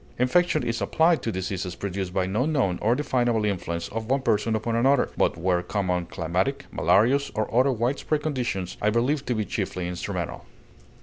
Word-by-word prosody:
Infection 155 +6 +2
is 115 0 -2
applied 165 0 +3
to 115 - -2
diseases 95 -1 -3
produced 95 0 -4
by 95 0 0
no 105 +9 0
known 130 - +1
or 115 +3 +3
definable 120 -6 +1
influence 85 -4 -2
of 115 +1 -5
one 135 0 +1
person 110 0 +1
upon 115 +1 -1
another, 135 +3 +3
but - - +1
where 90 0 +1
common 90 -3 -1
climatic, 90 +13 -1
malarious, 130 +8 +3
or 110 -1 -2
other 130 +3 +4
wide 125 +3 0
spread 150 -1 -1
conditions 120 - -2
are 105 - +3
believed 130 +6 0
to 125 - 0
be 110 -1 -1
chiefly 90 -4 -3
instrumental. 90 -1 -4
110 Hz, 180 wpm, -25 LUFS, 95-130 Hz, -, other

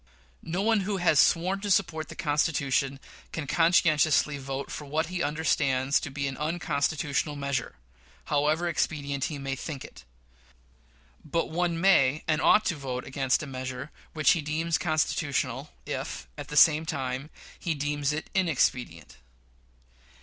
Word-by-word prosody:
No 175 +4 -2
one 225 0 +3
who 195 +1 -2
has 175 -5 +3
sworn 185 +4 +3
to 205 - -3
support 170 -5 +1
the - - -8
Constitution 140 -3 0 0.3
can 160 - -4
conscientiously 155 -2 +3
vote 135 0 -5
for 150 - -6
what 155 +3 -1
he 180 - -1
understands 140 -3 +1
to 150 - -6
be 140 +1 -3
an 135 -1 -5
unconstitutional 150 -2 -1
measure, 140 - -3 0.5
however 150 +4 +1
expedient 140 -4 -1
he 150 - -4
may 135 -1 -3
think 140 0 -6
it; - - -13 1.2
but 165 +2 -2
one 170 0 0
may 155 -6 +4
and 155 -1 +1
ought 215 - +5
to 170 - 0
vote 130 -3 -5
against 135 +1 0
a - - -4
measure 130 +1 -6 0.2
which 155 -1 +4
he 165 - +2
deems 160 +3 -1
constitutional, 145 -4 -1 0.2
if, 60 - -5
at - - -7
the 150 - -4
same 155 0 +7
time, 135 -2 -3 0.3
he 170 -3 -1
deems 145 0 -1
it 150 +1 -4
inexpedient. 125 - 0
150 Hz, 150 wpm, -27 LUFS, 140-165 Hz, 1.2 s, same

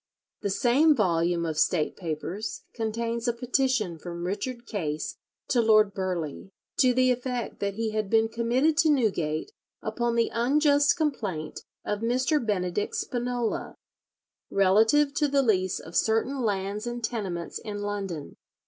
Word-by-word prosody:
The 205 - -1
same 265 +10 +4
volume 170 -5 +1
of 155 -1 -2
State 160 -4 +2
Papers 175 +5 -4
contains 230 +1 -2
a 240 - +2
petition 245 - 0
from 170 +1 -6
Richard 235 +6 -4
Case 155 -9 -3 0.3
to 245 - +3
Lord 215 -2 +5
Burghley, 180 -3 -3 0.3
to 255 -2 +6
the 255 0 +4
effect 250 -1 -3
that 200 -1 -2
he 225 0 -1
had 215 -2 -2
been 225 +1 +4
committed 240 +7 +1
to 315 - +4
Newgate 195 - +1 0.3
"upon 240 -1 -1
the 230 0 +2
unjust 285 +5 +3
complaint 205 - -2 0.3
of 210 0 -1
Mr. 255 +5 +1
Benedict 200 -2 -1
Spinola, 245 -1 -2 0.7
relative 220 +10 +4
to 295 +1 +2
the 280 -1 +2
lease 185 -6 +1
of 165 +2 -11
certain 225 +5 +1
lands 205 0 -2
and 240 0 -4
tenements 195 -7 -3
in 205 -1 -5
London." 195 -7 -4
220 Hz, 140 wpm, -27 LUFS, 190-250 Hz, 0.7 s, to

